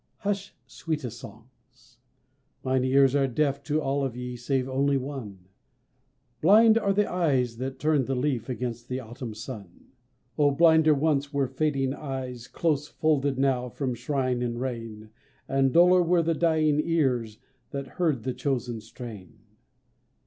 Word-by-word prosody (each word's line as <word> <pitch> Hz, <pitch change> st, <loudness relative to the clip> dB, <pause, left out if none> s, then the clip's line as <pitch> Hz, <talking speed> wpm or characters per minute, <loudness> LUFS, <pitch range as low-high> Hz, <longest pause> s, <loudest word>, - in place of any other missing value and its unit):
Hush, 200 Hz, -1 st, -3 dB
sweetest 140 Hz, -8 st, -5 dB
songs! 125 Hz, -1 st, -16 dB, 0.6 s
Mine 130 Hz, 0 st, +1 dB
ears 135 Hz, 0 st, +4 dB
are 140 Hz, -1 st, +3 dB
deaf 140 Hz, +2 st, 0 dB
To 150 Hz, +1 st, 0 dB
all 140 Hz, -1 st, -1 dB
of 125 Hz, -3 st, -3 dB
ye 125 Hz, 0 st, -5 dB
save 130 Hz, +2 st, -1 dB
only 135 Hz, +1 st, +1 dB
one. 125 Hz, -9 st, -7 dB, 1.0 s
Blind 220 Hz, +6 st, +6 dB
are 200 Hz, -3 st, +1 dB
the 205 Hz, +1 st, +2 dB
eyes 135 Hz, -10 st, 0 dB
that 130 Hz, +2 st, -4 dB
turn 150 Hz, -3 st, +1 dB
the 135 Hz, -, -1 dB
leaf 130 Hz, -2 st, -1 dB
Against 120 Hz, -1 st, -4 dB
the 130 Hz, 0 st, -2 dB
Autumn 120 Hz, -1 st, -8 dB
sun. 105 Hz, -6 st, -10 dB, 0.5 s
Oh, 145 Hz, -1 st, +5 dB
blinder 160 Hz, +1 st, +5 dB
once 145 Hz, -1 st, 0 dB
were 140 Hz, -2 st, +1 dB
fading 135 Hz, -1 st, 0 dB
eyes, 130 Hz, -4 st, -6 dB
Close 150 Hz, -2 st, -1 dB
folded 145 Hz, -4 st, 0 dB
now 130 Hz, -2 st, +1 dB
from 130 Hz, 0 st, -3 dB
shine 130 Hz, 0 st, -1 dB
and 120 Hz, -1 st, -2 dB
rain, 115 Hz, -4 st, -6 dB, 0.4 s
And 135 Hz, -1 st, +2 dB
duller 180 Hz, +3 st, +6 dB
were 175 Hz, 0 st, +2 dB
the 165 Hz, +1 st, +1 dB
dying 155 Hz, -2 st, +2 dB
ears 125 Hz, -10 st, 0 dB, 0.3 s
That 140 Hz, -1 st, -4 dB
heard 150 Hz, -4 st, -1 dB
the 130 Hz, -, -2 dB
chosen 120 Hz, -5 st, -2 dB
strain. 105 Hz, -7 st, -10 dB
135 Hz, 150 wpm, -27 LUFS, 125-150 Hz, 1.0 s, Blind